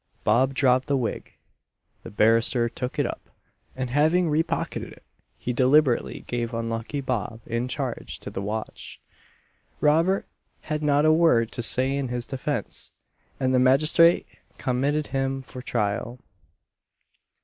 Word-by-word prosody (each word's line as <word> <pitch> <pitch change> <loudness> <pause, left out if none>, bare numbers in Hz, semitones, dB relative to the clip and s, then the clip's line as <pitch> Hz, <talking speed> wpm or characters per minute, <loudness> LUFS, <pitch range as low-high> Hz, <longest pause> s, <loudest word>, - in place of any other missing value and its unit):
Bob 130 +5 +2
dropped 130 -1 +3
the 140 - +2
wig; 120 -4 -4 0.7
the - - -9
barrister 115 +3 +3
took 125 +2 -5
it - - +2
up; - - -6 0.5
and 130 -1 -4
having 160 +4 +3
re 155 +2 +3
pocketed - - -4
it - - -16 0.3
he 125 - -3
deliberately 130 +1 +2
gave 120 -1 -3
unlucky 115 +4 -3
Bob 115 -4 -3
in 115 +2 -2
charge 130 -1 -4
to - - -8
the 95 - -4
watch. 105 +2 -6 0.8
Robert 165 +6 +2 0.4
had 155 0 -3
not 145 0 +3
a 155 - +6
word 140 -9 +3
to - - -4
say 130 +3 +1
in 140 -2 -2
his 120 0 -3
defence, 135 -3 -4 0.5
and 130 0 +1
the 130 - +4
magistrate 155 +6 +5 0.3
committed 140 +4 0
him 135 0 -1
for 130 0 -9
trial. 115 0 -2
130 Hz, 140 wpm, -25 LUFS, 120-145 Hz, 0.8 s, a